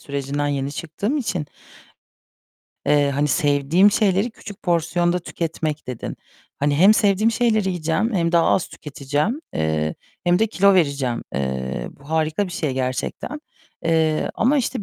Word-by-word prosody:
sürecinden 140 Hz, +1 st, -2 dB
yeni 140 Hz, 0 st, -2 dB
çıktığım 190 Hz, -, -3 dB
için, 185 Hz, -, -2 dB, 1.4 s
eee, 145 Hz, -1 st, +3 dB
hani 145 Hz, +2 st, 0 dB
sevdiğim 145 Hz, +8 st, +3 dB
şeyleri 200 Hz, +2 st, +2 dB
küçük 210 Hz, -3 st, -11 dB
porsiyonda 175 Hz, +1 st, +1 dB
tüketmek 160 Hz, -3 st, -4 dB
dedin. 125 Hz, -3 st, -5 dB, 0.4 s
Hani 145 Hz, 0 st, +1 dB
hem 195 Hz, +6 st, +7 dB
sevdiğim 210 Hz, +1 st, +3 dB
şeyleri 220 Hz, -4 st, +2 dB
yiyeceğim 180 Hz, +6 st, -1 dB
hem 170 Hz, -2 st, +1 dB
daha 170 Hz, -1 st, +4 dB
az 185 Hz, -, +2 dB
tüketeceğim, 150 Hz, -, -3 dB
eee, 80 Hz, 0 st, 0 dB, 0.3 s
hem 175 Hz, 0 st, +3 dB
de 225 Hz, -, +3 dB
kilo 200 Hz, -2 st, +4 dB
vereceğim. 140 Hz, -8 st, +1 dB
Eee, 65 Hz, -2 st, -3 dB
bu 140 Hz, +2 st, -16 dB
harika 160 Hz, +4 st, +1 dB
bir 180 Hz, -, -8 dB
şey 155 Hz, -6 st, -2 dB
gerçekten. 130 Hz, -, -3 dB, 0.4 s
Eee, 160 Hz, -1 st, +1 dB
ama 270 Hz, +6 st, +2 dB
işte 230 Hz, -5 st, -2 dB
160 Hz, 140 wpm, -22 LUFS, 140-195 Hz, 1.4 s, hem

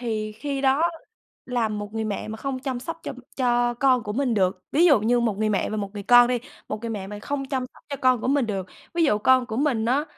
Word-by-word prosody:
Thì 215 Hz, -3 st, -3 dB
khi 275 Hz, +5 st, -4 dB
đó 270 Hz, +3 st, +3 dB, 0.6 s
làm 225 Hz, -4 st, -1 dB
một 205 Hz, +1 st, -7 dB
người 220 Hz, -, -1 dB
mẹ 210 Hz, 0 st, -3 dB
mà 220 Hz, -, -5 dB
không 270 Hz, +3 st, -3 dB
chăm 255 Hz, -2 st, -4 dB
sóc 330 Hz, +5 st, -6 dB
cho -, -, -4 dB, 0.2 s
cho 240 Hz, -2 st, +2 dB
con 255 Hz, 0 st, +3 dB
của 210 Hz, -1 st, -4 dB
mình 255 Hz, -1 st, 0 dB
được, 185 Hz, -2 st, +1 dB
ví 325 Hz, +4 st, +4 dB
dụ 285 Hz, -9 st, +6 dB
như 240 Hz, +3 st, +2 dB
một 220 Hz, -4 st, 0 dB
người 215 Hz, 0 st, +1 dB
mẹ 205 Hz, -2 st, 0 dB
và 215 Hz, -, -2 dB
một 200 Hz, -2 st, -3 dB
người 205 Hz, -, -5 dB
con 245 Hz, +3 st, +7 dB
đi, 250 Hz, -1 st, +1 dB, 0.3 s
một 215 Hz, 0 st, -4 dB
người 230 Hz, -1 st, -4 dB
mẹ 200 Hz, -3 st, -4 dB
mà 205 Hz, +1 st, -7 dB
không 280 Hz, +2 st, -3 dB
chăm 260 Hz, -2 st, -1 dB
sóc -, -, -20 dB
cho 280 Hz, -, -4 dB
con 255 Hz, -2 st, +3 dB
của -, -, -2 dB
mình 275 Hz, -2 st, +2 dB
được, 195 Hz, -4 st, -3 dB, 0.3 s
ví 335 Hz, -1 st, +3 dB
dụ 210 Hz, -8 st, +3 dB
con 255 Hz, +3 st, +4 dB
của 220 Hz, -, -4 dB
mình 260 Hz, -5 st, +1 dB
nó 265 Hz, +6 st, +2 dB
240 Hz, 270 wpm, -24 LUFS, 215-265 Hz, 0.6 s, con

